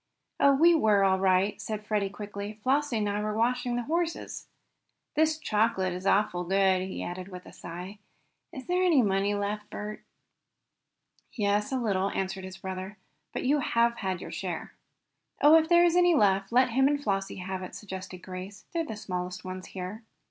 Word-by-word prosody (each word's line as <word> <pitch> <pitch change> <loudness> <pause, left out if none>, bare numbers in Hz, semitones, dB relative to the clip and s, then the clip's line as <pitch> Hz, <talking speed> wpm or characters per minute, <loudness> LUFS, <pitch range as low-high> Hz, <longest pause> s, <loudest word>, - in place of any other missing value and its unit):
"Oh, 280 -1 +6
we 335 +5 +6
were 215 -10 +4
all 190 -1 +3
right," 190 +2 +2
said 215 -1 -5
Freddie 210 -2 0
quickly. 205 +1 -7
"Flossie 275 -1 +1
and 210 -1 0
I 205 +1 -1
were 210 0 -2
watching 245 +1 +1
the 245 - -1
horses. 335 +4 -2 0.7
This 315 0 +3
chocolate 210 - +1
is 185 +2 -4
awful 195 -3 +2
good!" 190 0 +3
he 190 - -5
added 180 +1 -5
with 180 -2 -10
a - - -13
sigh. 180 +4 -8 0.5
"Is 260 -2 -8
there 360 +1 +1
any 330 -8 +4
money 200 0 +1
left, 210 +1 -3
Bert?" 210 +1 -6 1.3
"Yes, 210 +2 0
a 265 - 0
little," 200 -5 0
answered 190 -1 -3
his 190 0 -8
brother 190 +2 -6 0.3
"But - - -4
you 290 +3 +3
have 235 -2 +2
had 190 -3 -3
your - - -7
share." - - -5 0.7
"Oh, 295 +2 +7
if 320 0 +5
there 345 0 +6
is 345 0 +3
any 355 -1 +5
left 195 -5 +2
let 250 +1 +4
him 265 +3 +4
and 290 0 +1
Flossie 195 -4 -1
have 185 0 -5
it," 185 - -8
suggested 190 -3 -8
Grace. 185 +2 -8
"They're 335 -1 0
the 255 -9 -6
smallest 180 -3 -5
ones 185 0 -6
here." 190 +4 -6
205 Hz, 185 wpm, -28 LUFS, 190-250 Hz, 1.3 s, Oh